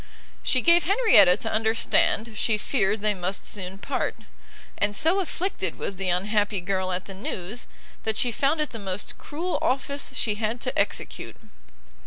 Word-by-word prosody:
She 255 - +2
gave 340 +3 +5
Henrietta 370 - +6
to 225 - -4
understand 220 0 +1
she 215 +1 +2
feared 210 -2 0
they 210 0 +2
must 185 0 -4
soon 190 -2 -2
part; - - -2 0.6
and 205 0 +2
so 330 - +4
afflicted 380 +1 -2
was 195 - -4
the 190 -1 -1
unhappy 205 +3 +1
girl 185 0 -2
at 180 0 -2
the 195 - -8
news, 190 +3 -5 0.3
that 220 -1 -1
she 245 - +2
found 280 +6 +1
it 300 - -2
the 230 - -7
most 190 -1 -5
cruel 340 +5 -3
office 280 +1 -1
she 220 -4 +1
had 225 +2 -1
to - - -2
execute. - - -2
215 Hz, 165 wpm, -25 LUFS, 195-275 Hz, 0.6 s, Henrietta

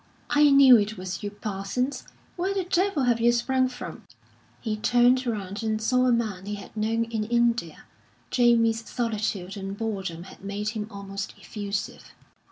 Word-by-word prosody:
"I 295 0 +6
knew 275 -4 +8
it 210 +1 -2
was 185 0 -5
you, 205 - -3
Parsons! 205 +6 -3 0.3
Where 375 +3 -1
the 385 - 0
devil 360 -4 +1
have 240 -2 +2
you 235 +1 +5
sprung 255 +2 +1
from?" 250 0 -8 0.5
He 220 -3 -2
turned 245 +3 +3
round 205 -2 -3
and 220 -1 -1
saw 255 +3 +2
a - - +4
man 215 -5 -1
he 210 - -3
had 200 - -11
known 225 +2 0
in 230 -2 -3
India. 235 -7 0 0.5
Jamie's 230 -2 +3
solitude 215 -5 -2
and 195 0 -6
boredom 195 -7 -4
had 190 - -14
made 200 +1 -3
him 215 -2 -4
almost 200 -1 -6
effusive. 200 -2 -5
225 Hz, 165 wpm, -26 LUFS, 200-245 Hz, 0.5 s, knew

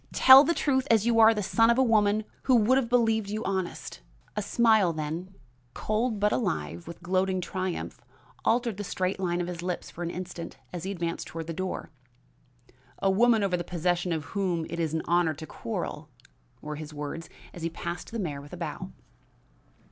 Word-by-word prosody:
tell 265 +1 +9
the 335 +3 +1
truth 265 -2 +1
as 220 -2 +4
you 235 -1 +3
are 220 0 +8
the 210 -2 -1
son 225 +4 +3
of 235 - +4
a 265 - +5
woman 215 -2 +3 0.3
you 255 - +7
would 235 +2 +4
have 265 -2 +2
us - - -12
believe 225 -4 +2
honest." 185 - -3 0.3
A 210 - -1
smile 220 -3 +3
then, 160 +5 -5 0.4
cold 215 +1 -1
but 210 +1 +2
alive 85 - -2
with 170 +1 -10
gloating 185 +1 +1
triumph, 185 0 -4 0.4
altered 235 -3 +1
the 205 - -4
straight 185 0 -2
line 175 -2 0
of - - -2
his 175 -1 -5
lips 180 0 -4
for 175 - -10
an 170 - -2
instant 180 -1 -7 0.2
as 175 0 -5
he 195 - -2
advanced 170 -3 -3
toward 165 0 -6
the 165 - -5
door. 185 -2 -4 1.1
"A 195 - +2
woman 225 +2 +4
over 190 -2 +1
the 175 - -2
possession 175 +1 -1
of 160 -2 -1
whom 180 -5 0
it 170 - -4
is 160 -1 -1
an 160 - -1
honor 170 -2 +2
to 155 +2 -8
quarrel!" 160 -7 -5 0.5
were 150 0 -5
his 155 0 -8
words 150 +3 -6 0.2
as 175 - -9
he 165 - -1
passed 170 +1 -6
the 230 - -4
mayor 150 -9 -3
with 145 - -13
a - - -6
bow. - - -5
185 Hz, 200 wpm, -28 LUFS, 170-220 Hz, 1.1 s, tell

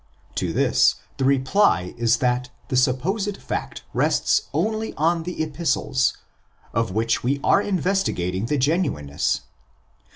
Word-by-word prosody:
To - - -2
this - - +3 0.2
the 135 - 0
reply 135 - +2
is 120 0 +2
that 125 0 0 0.2
the - - -1
supposed 180 - +1
fact - - -5
rests - - +1
only 220 0 -1
on 165 +2 +1
the 175 -1 -3
Epistles, 140 -4 0 0.6
of 115 -3 0
which 115 +3 0
we 140 +3 0
are 200 - +4
investigating 175 - -1
the 150 - 0
genuine 140 - 0
ness. 70 +1 -1
135 Hz, 130 wpm, -23 LUFS, 120-180 Hz, 0.6 s, are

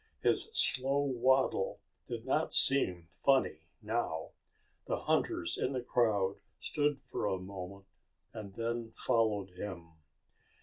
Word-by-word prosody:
His - - +2
slow 135 - +2
waddle 130 -5 +1 0.3
did 115 -1 -6
not 150 +4 +1
seem 90 -11 +5
funny 135 - +2 0.2
now. 105 -8 -2 0.6
The - - -2
hunters 85 - 0
in 135 - -1
the 125 -2 -3
crowd 105 -6 +1 0.2
stood 145 -2 0
for 130 -5 -4
a 95 - 0
moment, 95 +1 -8 0.5
and 100 -3 -8
then 115 0 -3
followed 110 -6 0
him. 90 -3 -7
115 Hz, 120 wpm, -32 LUFS, 95-130 Hz, 0.6 s, seem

